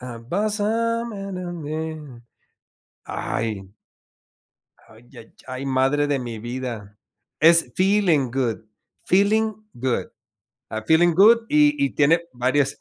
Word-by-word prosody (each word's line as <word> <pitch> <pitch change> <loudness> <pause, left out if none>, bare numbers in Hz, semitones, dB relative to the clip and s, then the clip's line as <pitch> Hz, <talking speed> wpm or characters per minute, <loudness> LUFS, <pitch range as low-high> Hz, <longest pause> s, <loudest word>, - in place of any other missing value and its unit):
and 205 - -2
I 180 -1 -5
mean. 155 -5 -6 0.8
¡Ay! 110 -4 -3 1.2
Ay 110 +2 -18
ya - - -12 0.3
yay, 130 +1 -6
madre 135 +2 +1
de 145 -1 0
mi 120 -3 -6
vida. 120 -3 -6 0.4
Es 165 +1 +5
Feeling 185 - +2
Good, 125 -4 -1 0.5
Feeling 215 +3 +2 0.2
Good. 125 0 -2 0.6
Ah, 110 0 -4
Feeling 170 +2 +4
good, 215 +6 +7
y 295 0 +4
y - - 0
tiene 160 +3 +3
varias 130 +3 0
150 Hz, 110 wpm, -22 LUFS, 125-195 Hz, 1.2 s, good